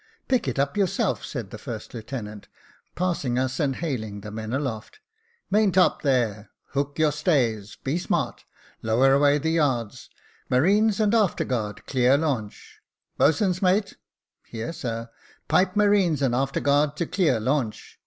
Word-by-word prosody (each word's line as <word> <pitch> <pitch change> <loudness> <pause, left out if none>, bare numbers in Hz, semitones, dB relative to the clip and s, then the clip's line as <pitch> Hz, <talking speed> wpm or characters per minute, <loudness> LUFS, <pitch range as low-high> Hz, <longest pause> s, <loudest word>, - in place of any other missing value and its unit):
" - - -46
Pick 255 - +1
it 130 - -2
up 140 +1 0
yourself," 195 -4 0
said - - -6
the - - -8
first - - -7
lieutenant, 110 -3 -7 0.5
passing 165 -9 -1
us, 130 +1 -1
and 140 -3 +1
hailing 110 -11 -4
the 105 +1 -8
men 110 +1 -6
aloft. 130 - -4 0.3
" 470 0 -41
Maintop, 195 -3 +3
there, 115 -7 0 0.2
hook 140 0 -2
on - - 0
your 155 - +4
stays. 125 - 0
Be 145 +6 -1
smart. 180 - -2 0.4
Lower 125 +5 +3
away 145 +1 +4
the 160 +2 -1
yards. 130 -9 -1 0.4
Marines 200 - +3
and 215 0 +2
after 215 -5 +2
guard, 105 -5 -3
clear 130 0 +3
launch. 135 -9 -4 0.4
Boatswain's 180 +3 +2
mate." 195 +2 +1 0.3
" - - -62
Here, 115 +8 -5
sir." 115 -5 -5 0.4
"Pipe 185 0 +2
marine, 205 -6 +3
and 130 -3 +2
after 135 +2 0
guard 145 +1 +2
to 170 - -1
clear 170 - +1
launch." 125 -1 -2
140 Hz, 160 wpm, -25 LUFS, 120-175 Hz, 0.5 s, your